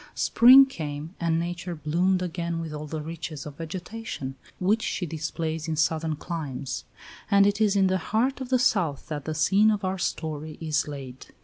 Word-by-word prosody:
Spring 260 +3 +8
came, 155 - -6
and 165 -1 +1
nature 175 +1 -4
bloomed 180 +4 +1
again 170 -1 -3
with 160 -2 -5
all 150 0 -6
the 155 0 -4
richness 160 -2 -6
of 145 -2 -9
vegetation 175 -3 -6 0.3
which 205 +5 +2
she 190 - -2
displays 160 0 -3
in 160 - -1
southern 160 0 +1
climes; 145 -5 -5 0.4
and 200 -1 +6
it 205 +1 +1
is 210 -2 +3
in 195 -1 +4
the 185 0 +2
heart 245 +10 0
of 255 - -5
the 260 - +4
South 180 - +1
that 150 -3 -4
the 155 - -3
scene 200 +7 +4
of 210 -2 0
our 190 0 -2
story 155 -2 -3
is 155 -2 0
laid. 135 -3 -8
165 Hz, 185 wpm, -26 LUFS, 155-195 Hz, 0.4 s, Spring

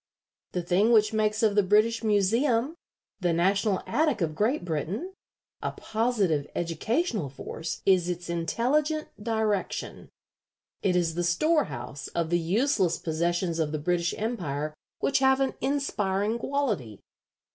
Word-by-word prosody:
The 180 - -1
thing 190 +6 +3
which 215 -1 +4
makes 215 0 +1
of 215 -2 +4
the 205 - +5
British 215 +4 +3
Museum, 230 +6 +2 0.5
the 175 -3 +1
National 195 +3 +1
Attic 300 -6 +1
of 165 -4 -1
Great 215 - 0
Britain, 180 - -3 0.5
a - - -2
positive 215 -10 0
educational 200 - -1
force 160 +4 -6
is 185 -2 +4
its 175 0 -4
intelligent 255 - 0
direction. 220 -3 -2 0.7
It 185 -3 +1
is 170 -2 +1
the 175 +2 -1
storehouse 175 - 0
of 170 -1 -1
the 175 - +3
useless 190 - +1
possessions 170 +1 -1
of 155 -2 0
the 155 - -1
British 170 +3 0
Empire 155 - -3 0.3
which 275 - +2
have 265 0 +4
an 270 -1 +1
inspiring 220 -6 0
quality. 220 - -2
200 Hz, 135 wpm, -27 LUFS, 170-230 Hz, 0.7 s, the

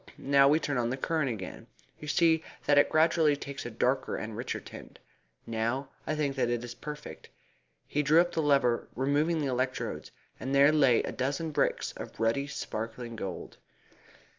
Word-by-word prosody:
Now 140 0 +4
we 150 +3 +4
turn 145 -4 -1
on 120 -1 0
the 130 - -2
current 155 0 0
again. 100 -6 -6 0.3
You 150 - -8
see 160 +1 +3 0.2
that 145 0 +5
it - - +4
gradually 160 -1 +4
takes 140 -2 -6
a - - -5
darker 130 +4 0
and 110 0 -5
richer 120 +3 -3
tint. - - -12 0.5
Now 115 +4 -2 0.2
I 155 - 0
think 145 -3 -1
that 125 -2 +1
it 120 0 -1
is 120 - -6
perfect." 150 - -9 0.6
He 150 - 0
drew 150 +3 +5
up 175 0 +3
the 165 - 0
lever, 140 -5 +2
removed 145 +5 +1
the 150 - -1
electrodes, 130 0 -2 0.3
and 135 +1 -2
there 140 +2 +7
lay 135 -6 +4
a - - -3
dozen 145 +5 -2
bricks - - 0
of - - -9
ruddy 115 +5 +1
sparkling 115 -3 -5
gold. 95 -4 -6
140 Hz, 180 wpm, -29 LUFS, 120-150 Hz, 0.6 s, there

